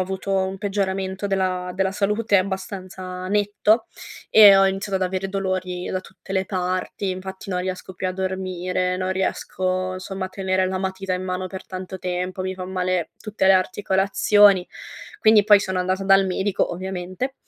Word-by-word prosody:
avuto 190 +1 -3
un 190 0 0
peggioramento 195 -1 -2
della 185 -2 -1
della 190 0 0
salute 205 0 +2
abbastanza 185 -1 -5
netto 210 +2 +2 0.4
e 205 -2 +9
ho 195 - +5
iniziato 195 +1 -1
ad 190 - -2
avere 190 +1 -3
dolori 185 -2 -3
da 185 - -2
tutte 190 +1 -12
le 190 0 +1
parti. 185 +1 -2
Infatti 190 +2 -7
non 180 -1 -1
riesco 185 0 -5
più 185 0 -2
a - - -2
dormire, 185 -1 -2
non 185 0 -1
riesco 185 0 -2
somma 190 0 -5
a - - -10
tenere 190 -1 0
la 185 0 -2
matita 190 0 -3
in 180 0 -2
mano 185 0 -3
per 190 0 -8
tanto 185 0 -7
tempo, 180 +1 -3
mi 190 0 -3
fan 185 0 -7
male 185 -2 -1
tutte 210 -3 -1
le 195 - +7
articolazioni. 195 +1 +3 0.5
Quindi 215 -2 +6
poi 205 -1 +7
sono 190 -2 -2
andata 185 +1 -1
dal 195 0 +5
medico 190 +2 0
ovviamente 185 +7 -4
190 Hz, 170 wpm, -23 LUFS, 185-195 Hz, 0.5 s, e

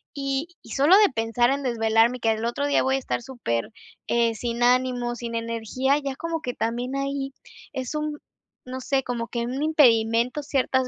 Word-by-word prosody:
y 275 +2 -2 0.2
y - - -13
sólo 295 +8 +6
de 420 -1 +6
pensar 230 +3 +1
en 280 - -1
desvelarme, 230 0 +2
que 225 - +1
al 220 0 0
otro 260 +4 -1
día 285 - +3
voy 265 0 +2
a - - 0
estar 250 - -3
super, 230 - -3 0.4
eh, 235 -1 +2
sin 235 +1 -2
ánimo, 245 -1 +2
sin 235 -1 -5
energía, 230 +4 0
ya 275 -2 -4
como 330 +1 -3
que 250 -5 -4
también 240 +4 -2
ahí 275 0 -2 0.4
es 260 +1 -4
un 300 0 -2 0.5
no 255 +1 -6
sé, 270 +1 0
como 235 -2 -3
que 235 - -3
un 260 +3 -3
impedimento, 240 -3 +3
ciertas 260 -2 +1
250 Hz, 190 wpm, -25 LUFS, 235-275 Hz, 0.5 s, sólo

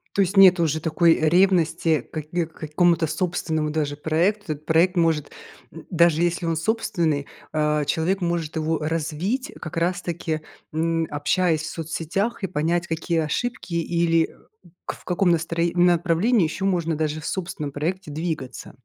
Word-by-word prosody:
То 200 - +3
есть 195 +1 0
нету 185 -3 +7
уже 155 0 0
такой 165 +1 +3
ревности 165 -2 +3
каки 160 +5 -4
к 160 - -19
какому-то 165 +2 +1
собственному 160 -1 -1
даже 150 -2 -2
проекту. 165 +4 0
Этот 150 +1 -14
проект 170 +3 +3
может, 165 -4 +1 0.4
м, 165 - -11
даже 170 -2 +3
если 175 0 0
он 165 - 0
собственный, 165 -6 0 0.2
э, 150 -1 +1
человек 180 +6 0
может 170 -3 -2
его 160 0 0
развить 165 - -2
как 155 - -7
раз 180 +3 0
таки, 170 -2 -3 0.3
м, 165 +1 0
общаясь 155 +2 +1
в 155 - -4
соцсетях, 175 +8 -3
и - - +1
понять, 170 +1 -1
какие 165 +1 -1
ошибки 180 +4 -3
или, 170 -1 +1
э, - - -17 0.5
в - - -6
каком 180 0 +2
настро 165 0 0
направлении 175 +4 +3
ещё 190 +5 -3
можно 170 -4 0
даже 155 0 -2
в 155 - -10
собственном 170 -6 -4
проекте 170 +3 -3
двигаться. 155 -4 -5
165 Hz, 155 wpm, -23 LUFS, 155-180 Hz, 0.5 s, нету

